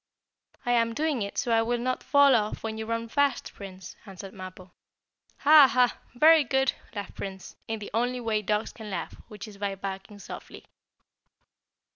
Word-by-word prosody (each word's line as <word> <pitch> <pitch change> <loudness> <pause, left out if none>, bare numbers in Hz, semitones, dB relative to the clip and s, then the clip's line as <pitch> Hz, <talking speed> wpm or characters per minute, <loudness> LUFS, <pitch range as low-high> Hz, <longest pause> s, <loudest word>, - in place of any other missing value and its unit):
"I 245 - +1
am 230 -1 +2
doing 300 -3 0
it 200 0 -4
so 240 - 0
I 225 0 +4
will 240 +2 0
not 255 +2 -2
fall 285 -1 +5
off 210 -1 -1
when 220 -1 -3
you 220 0 -5
run 230 0 -2
fast, 285 +3 0
Prince," 190 -2 -10
answered 195 0 -10
Mappo. 185 -1 -10 0.7
"Ha! 295 -1 +8
Ha! 250 -1 +2 0.2
Very 315 +4 +7
good!" 265 -1 +1 0.2
laughed 205 -1 -6
Prince, 190 -1 -8
in 225 - -2
the 210 - -8
only 245 +2 0
way 220 -3 -1
dogs 210 +1 -1
can 220 -2 -9
laugh, 180 -4 -4
which 210 0 -9
is 205 -2 -13
by 200 -1 -2
barking 195 +1 -7
softly. 200 - -10
225 Hz, 175 wpm, -27 LUFS, 200-250 Hz, 0.7 s, Ha